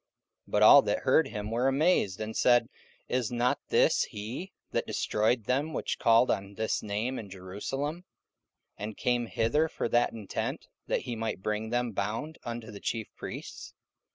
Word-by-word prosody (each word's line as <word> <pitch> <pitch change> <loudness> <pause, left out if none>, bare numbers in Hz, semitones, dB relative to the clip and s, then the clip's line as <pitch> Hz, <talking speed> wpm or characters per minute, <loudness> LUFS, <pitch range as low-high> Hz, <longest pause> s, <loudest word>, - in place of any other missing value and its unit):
44:009:021 - - -18
But - - +4
all - - +10
that - - 0
heard 160 - +4
him 105 -3 -5
were 120 +3 +1
amazed, 135 - +2
and 110 0 -4
said; 120 -1 +4 0.4
Is 125 -3 -1
not 120 +1 +1
this - - +4
he 115 - -6 0.2
that - - -1
destroyed 110 +2 +1
them 140 +7 0
which - - -2
called 115 +2 +5
on 100 +1 -3
this 110 +1 -1
name 110 +5 -2
in 105 - -8
Jerusalem, 135 - -5 0.7
and 105 +1 -5
came 120 -1 0
hither 120 +10 +1
for - - -2
that 120 0 +3
intent, 110 -4 -4 0.2
that - - 0
he 120 - -4
might 110 -4 -3
bring 105 +1 -2
them 120 0 0
bound 110 +11 -3
unto 115 -2 -6
the 100 - -9
chief 110 0 -3
priests? - - -8
115 Hz, 170 wpm, -29 LUFS, 105-125 Hz, 0.7 s, all